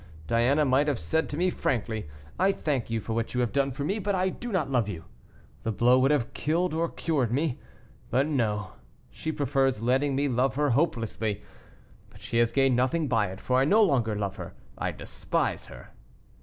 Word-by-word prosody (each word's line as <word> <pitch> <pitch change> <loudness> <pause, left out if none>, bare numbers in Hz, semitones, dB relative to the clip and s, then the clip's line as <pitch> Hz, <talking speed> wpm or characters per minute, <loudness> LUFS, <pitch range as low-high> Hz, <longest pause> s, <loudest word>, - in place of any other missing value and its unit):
Diana 125 - +3
might 135 +2 +3
have 145 -4 +1
said 120 - -1
to 145 - -4
me 180 +2 +2
frankly, 110 - -2 0.3
'I 195 +1 +4
thank 140 -10 -2
you 115 0 -1
for 110 +1 -4
what 115 +2 -2
you 125 - +2
have 120 - 0
done 140 -1 +1
for 135 +2 -4
me, 195 +8 -1
but 200 0 -1
I 185 0 +1
do 240 +5 -6
not 180 -8 0
love 120 -5 +1
you.' 85 -5 -6 0.6
The 115 - -2
blow 125 +4 +4
would 135 +1 +3
have 145 -5 +1
killed 170 +3 0
or 165 +1 0
cured 140 -8 -1
me. 140 +1 0 0.5
But 130 +4 +2
no; 105 - -1 0.4
she 160 - -4
prefers 135 -5 +1
letting 130 +4 +1
me 140 +1 +1
love 130 -1 +1
her 145 -1 +2
hopelessly; 115 -7 -1 0.7
but - - -17
she 115 - -1
has 120 -1 +3
gained 135 -2 +3
nothing 130 +6 +1
by 110 -5 +2
it, 95 +1 -8
for 125 0 +1
I 135 - +3
no 215 +8 +5
longer 120 - +2
love 100 -2 -3
her, - - -8 0.2
I - - -2
despise - - -3
her." - - -12
130 Hz, 205 wpm, -27 LUFS, 115-150 Hz, 0.7 s, no